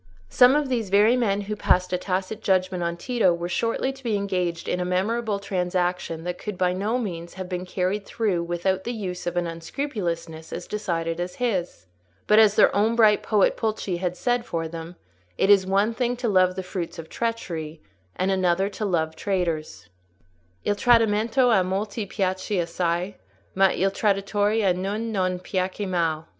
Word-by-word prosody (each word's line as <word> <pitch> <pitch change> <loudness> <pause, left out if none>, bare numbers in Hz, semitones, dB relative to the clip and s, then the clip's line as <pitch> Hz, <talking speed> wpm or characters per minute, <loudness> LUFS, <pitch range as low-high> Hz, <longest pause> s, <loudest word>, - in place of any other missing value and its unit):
Some 250 +2 +6
of 295 -1 +1
these 235 -6 -1
very 210 +5 +5
men 205 -5 +1
who 210 +1 -4
passed 180 -3 +1
a - - +2
tacit 190 +3 -3
judgment 185 -1 +1
on 170 0 -2
Tito 230 -1 +2
were 170 0 -4
shortly 230 +8 -1
to 270 0 -16
be 225 -4 0
engaged 180 -4 -2
in 180 - -1
a - - 0
memorable 205 +4 0
transaction 180 -3 -2
that 180 0 -4
could 210 -3 -5
by 180 -1 +2
no 205 +6 -1
means 170 -8 -5
have 185 -1 -6
been 180 0 -4
carried 185 +3 -1
through 200 -5 -1
without 175 +2 -1
the 240 - -3
use 185 -6 -5
of 175 0 -2
an 175 - +1
unscrupulousness 170 - -4
as - - -5
decided 170 -5 -2
as 180 +1 -4
his; 185 - -2 0.4
but, 210 +1 +5
as 215 -2 +6
their - - +5
own 215 +3 +2
bright 215 -3 +5
poet 210 -3 +2
Pulci 215 -5 -2
had 180 0 -3
said 245 +2 0
for 165 -7 -3
them, 165 +1 -8 0.4
it 195 - +4
is 190 -2 +5
one 200 +4 +2
thing 245 +1 0
to 245 -1 -2
love 185 -3 +3
the 190 - -4
fruits 180 -2 -5
of 165 -1 -8
treachery, 165 -10 -4 0.4
and 185 +1 0
another 185 0 +2
thing - - -17
to 215 - 0
love 160 -4 0
traitors— 170 - -2 0.8
"Il 205 - +2
tradimento 230 +2 +3
a 195 -5 +4
molti 200 +3 -3
piace 190 0 -1
assai, 175 +2 -1 0.4
Ma 195 0 +5
il 195 +1 +1
traditore 205 +1 +1
a 180 - +4
gnun 205 +5 -3
non 185 -3 0
piacque 185 +2 -3
mal." 165 -3 -1
190 Hz, 185 wpm, -24 LUFS, 175-210 Hz, 0.8 s, Some